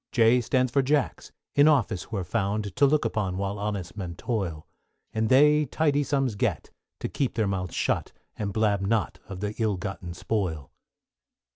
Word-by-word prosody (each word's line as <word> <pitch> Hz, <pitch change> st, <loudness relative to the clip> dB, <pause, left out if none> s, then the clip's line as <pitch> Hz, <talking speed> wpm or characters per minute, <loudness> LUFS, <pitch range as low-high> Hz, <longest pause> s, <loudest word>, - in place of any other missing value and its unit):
=J= 120 Hz, +1 st, +4 dB
stands 130 Hz, +1 st, +1 dB
for 140 Hz, -, +3 dB
Jacks, 140 Hz, +1 st, 0 dB, 0.2 s
in 145 Hz, +1 st, +6 dB
office 115 Hz, -, +2 dB
who 110 Hz, -, -5 dB
are 95 Hz, -, -1 dB
found, 100 Hz, +1 st, -2 dB
To 140 Hz, -, +6 dB
look 150 Hz, -2 st, +2 dB
on 95 Hz, -4 st, -1 dB
while 100 Hz, +1 st, -2 dB
honest 100 Hz, -4 st, -3 dB
men 90 Hz, -4 st, -5 dB
toil; 90 Hz, -7 st, -3 dB, 0.5 s
And 110 Hz, 0 st, 0 dB
they 150 Hz, +3 st, +5 dB
tidy 145 Hz, +1 st, +1 dB
sums 135 Hz, -3 st, 0 dB
get, 100 Hz, -, -2 dB, 0.3 s
to -, -, -1 dB
keep 135 Hz, -, -2 dB
their 110 Hz, -, +1 dB
mouths 95 Hz, -3 st, -2 dB
shut, -, -, 0 dB, 0.2 s
And 105 Hz, -2 st, -3 dB
blab 105 Hz, -1 st, +1 dB
not 110 Hz, +2 st, 0 dB
of 95 Hz, -1 st, -7 dB
the 105 Hz, 0 st, -2 dB
ill 110 Hz, -4 st, +1 dB
gotten 90 Hz, -2 st, -6 dB
spoil. 90 Hz, -9 st, -2 dB
105 Hz, 175 wpm, -26 LUFS, 95-130 Hz, 0.5 s, in